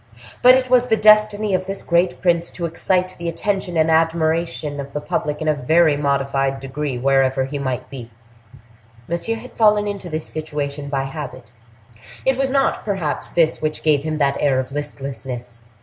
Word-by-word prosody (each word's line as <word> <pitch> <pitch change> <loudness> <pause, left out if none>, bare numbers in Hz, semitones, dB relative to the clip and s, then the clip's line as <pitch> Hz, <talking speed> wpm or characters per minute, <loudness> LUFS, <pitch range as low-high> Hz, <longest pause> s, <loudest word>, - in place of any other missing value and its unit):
But 250 +1 +8
it 260 0 +1
was 250 -1 +3
the 220 -2 +2
destiny 215 -1 +4
of 185 0 0
this 195 0 -5
great 175 +1 +1
prince 170 -1 +2
to 170 - -4
excite 185 +2 0
the 170 0 -2
attention 190 0 -2
and 160 0 +3
admiration 160 -2 0
of 140 0 -7
the 150 - -2
public 150 +1 -3
in - - -3
a 155 - +4
very 155 +3 +3
modified 140 -1 0
degree 135 0 -4
wherever 135 0 +2
he 140 +2 -5
might 130 -3 -3
be. 125 -4 -8 1.0
Monsieur 170 +7 -2
had 235 +3 -10
fallen 210 -2 +3
into 200 -3 -5
this 155 -1 -4
situation 145 -2 -4
by 135 -1 -1
habit. 135 -4 -7 0.7
It 265 - +3
was 270 +1 0
not, 275 0 +1
perhaps, 190 -8 -1
this 165 -2 +1
which 155 0 -2
gave 150 -3 +3
him 155 0 -2
that 140 -2 +1
air 135 -3 +2
of 130 +1 -4
listlessness. 135 -4 -6
155 Hz, 180 wpm, -20 LUFS, 140-185 Hz, 1.0 s, But